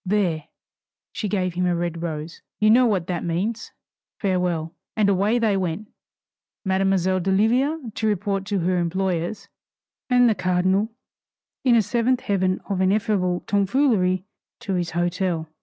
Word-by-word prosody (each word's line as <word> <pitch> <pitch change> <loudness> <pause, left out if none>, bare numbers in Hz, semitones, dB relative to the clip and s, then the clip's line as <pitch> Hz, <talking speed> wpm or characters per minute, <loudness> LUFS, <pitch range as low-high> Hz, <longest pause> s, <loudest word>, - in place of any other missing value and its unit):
There" 180 -6 0 0.7
she 210 - -3
gave 185 -3 -1
him 180 +1 0
a 175 - +1
red 170 -1 -3
rose 160 -1 -5 0.2
"You 215 0 +5
know 245 +2 +6
what 190 -6 0
that 175 -1 -3
means! 200 +7 -2 0.5
Farewell!" 180 -4 -1 0.2
And 210 -2 +3
away 200 +4 +2
they 220 -4 +2
went 190 +2 -3 0.8
Mademoiselle 190 -1 +2
d'Oliva 230 - +1
to 220 - -1
report 200 -1 0
to 200 -2 -1
her 180 +1 +1
employers, 185 +2 -2 0.6
and 245 -1 +5
the 225 - +4
cardinal, 185 +3 +1 0.7
in 250 -3 +5
a 225 - +4
seventh 240 +4 +1
heaven 185 -2 0
of 195 -2 -1
ineffable 190 -2 +1
tomfoolery, 200 -3 +1 0.4
to 210 -5 -3
his 175 -2 -1
hotel. 175 -1 -1
190 Hz, 140 wpm, -23 LUFS, 180-215 Hz, 0.8 s, know